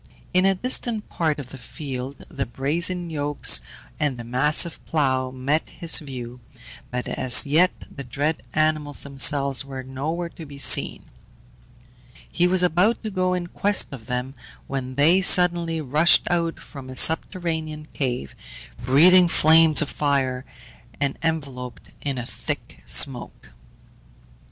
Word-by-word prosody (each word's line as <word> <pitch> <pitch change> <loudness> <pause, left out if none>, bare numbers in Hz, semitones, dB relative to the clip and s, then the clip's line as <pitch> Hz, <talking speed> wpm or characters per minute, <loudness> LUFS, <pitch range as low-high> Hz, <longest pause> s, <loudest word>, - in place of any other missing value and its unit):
In 185 +1 +3
a 195 - +2
distant 235 0 -1
part 155 -3 -1
of 140 -4 -8
the 135 - -11
field 130 +2 -7
the 135 -2 -5
brazen 170 +8 -1
yokes 145 - +2 0.4
and 145 -4 -1
the 120 - -7
massive 150 +7 +1
plough 130 -4 -1
met 135 +5 -2
his 170 -2 +2
view, 125 -4 -8 0.5
but 125 0 -4
as 125 -2 +2
yet 160 +6 +4 0.2
the 140 - -9
dread 145 +5 -2
animals 155 -2 0
themselves 140 -1 +3
were 135 -1 -8
nowhere 155 +7 -4
to 165 - -12
be 140 0 -11
seen. 140 - +3 1.3
He 175 - +2
was 180 0 +2
about 180 +8 +1
to 215 - -4
go 185 -1 0
in 180 -1 -3
quest 200 +3 +1
of 125 -5 -10
them, 125 +1 -4 0.3
when 130 -1 -5
they 165 +7 +4
suddenly 175 -3 +3
rushed 150 +4 +4
out 170 -1 -1
from 135 -3 -11
a 130 - -8
subterranean 160 -1 -1
cave, 125 - -3 0.5
breathing 175 +8 +6
flames 160 -1 +5
of 145 - -7
fire, 135 -3 -1 0.5
and 140 -1 -1
enveloped 140 -6 -5
in 140 -2 -3
a 120 - -5
thick - - -6
smoke. - - +1
145 Hz, 140 wpm, -23 LUFS, 130-170 Hz, 1.3 s, breathing